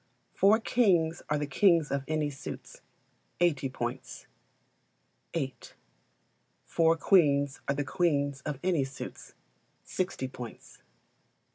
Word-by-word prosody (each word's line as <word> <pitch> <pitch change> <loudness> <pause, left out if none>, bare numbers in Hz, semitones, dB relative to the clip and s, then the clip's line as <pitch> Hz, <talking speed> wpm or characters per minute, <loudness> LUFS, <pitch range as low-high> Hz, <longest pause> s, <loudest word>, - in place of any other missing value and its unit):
Four 200 +3 +5
kings 180 -9 +2
are 150 - +2
the 150 - -1
kings 165 +1 +3
of 140 -1 -1
any 155 -2 0
suits 135 - -9 0.6
80 145 -6 +2
points. 125 0 -5 1.1
viii. 135 -6 -2 1.1
Four 165 0 +2
Queens 145 -7 +3
are 140 - +1
the 145 - -1
queens 140 -2 0
of 150 -2 -4
any 175 -6 +2
suits 135 +1 -8 0.5
60 180 -8 -3
points. 125 -3 -10
150 Hz, 110 wpm, -29 LUFS, 140-170 Hz, 1.1 s, Four